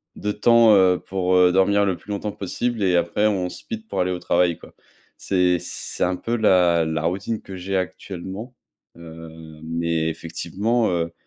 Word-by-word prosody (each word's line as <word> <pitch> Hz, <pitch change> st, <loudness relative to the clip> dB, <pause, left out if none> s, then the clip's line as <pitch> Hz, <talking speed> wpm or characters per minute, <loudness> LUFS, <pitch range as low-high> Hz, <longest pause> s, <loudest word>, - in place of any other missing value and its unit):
de 105 Hz, -, -3 dB
temps, 115 Hz, -1 st, +5 dB
heu, 95 Hz, -2 st, +4 dB
pour, 95 Hz, -1 st, -1 dB
heu, 90 Hz, -1 st, +5 dB
dormir 100 Hz, +2 st, +3 dB
le 95 Hz, -3 st, -1 dB
plus 105 Hz, -, -11 dB
longtemps 105 Hz, +1 st, -3 dB
possible 110 Hz, +4 st, -3 dB
et 90 Hz, -2 st, +2 dB
après 85 Hz, +5 st, +1 dB
on 95 Hz, -4 st, -1 dB
speed 225 Hz, -, -8 dB
pour -, -, -4 dB
aller 90 Hz, -, 0 dB
au 90 Hz, -, -3 dB
travail, 85 Hz, -1 st, +1 dB
quoi. -, -, -15 dB, 0.4 s
C'est 90 Hz, -2 st, +1 dB
c'est -, -, -5 dB
un 90 Hz, +1 st, +1 dB
peu 115 Hz, +5 st, -3 dB
la 90 Hz, -6 st, +3 dB
la 80 Hz, 0 st, -2 dB
routine 95 Hz, +6 st, -2 dB
que 95 Hz, -, -10 dB
j'ai 95 Hz, +1 st, -3 dB
actuellement, 95 Hz, +5 st, -6 dB, 0.4 s
heu, 80 Hz, -1 st, -11 dB, 0.3 s
mais 80 Hz, 0 st, -1 dB
effectivement, 95 Hz, +8 st, -2 dB
heu, 85 Hz, -2 st, -2 dB
90 Hz, 175 wpm, -22 LUFS, 85-105 Hz, 0.4 s, temps